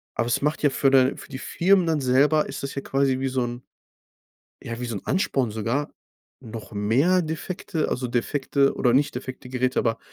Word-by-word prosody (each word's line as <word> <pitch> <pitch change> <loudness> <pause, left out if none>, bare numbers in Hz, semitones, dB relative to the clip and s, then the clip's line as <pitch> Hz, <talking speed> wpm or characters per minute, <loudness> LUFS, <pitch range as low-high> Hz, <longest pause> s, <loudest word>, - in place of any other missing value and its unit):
aber 115 +1 0
es 120 - 0
macht 150 +2 -1
ja 145 - +5
für 135 0 +2
den 130 0 +4
für - - -12
die 135 - -6
Firmen 185 +4 +2
dann 160 -3 0
selber 140 +4 +3
ist - - -7
das 140 - -4
ja 140 - -2
quasi 135 -1 +1
wie 135 - -1
so 130 -1 0
'n 120 +1 -5 1.0
ja, 115 +1 -6
wie 125 - -3
so 115 -3 -4
'n - - -7
Ansporn 135 - 0
sogar 115 +7 -2 0.5
noch 115 -4 -9
mehr 130 - +2
defekte 160 0 -3
also, 125 0 -2
defekte 135 +3 +1
oder 125 - +2
nicht 140 +3 +2
defekte 130 +1 -7
Geräte, 130 0 0
aber 115 -1 +1
130 Hz, 200 wpm, -24 LUFS, 120-145 Hz, 1.0 s, ja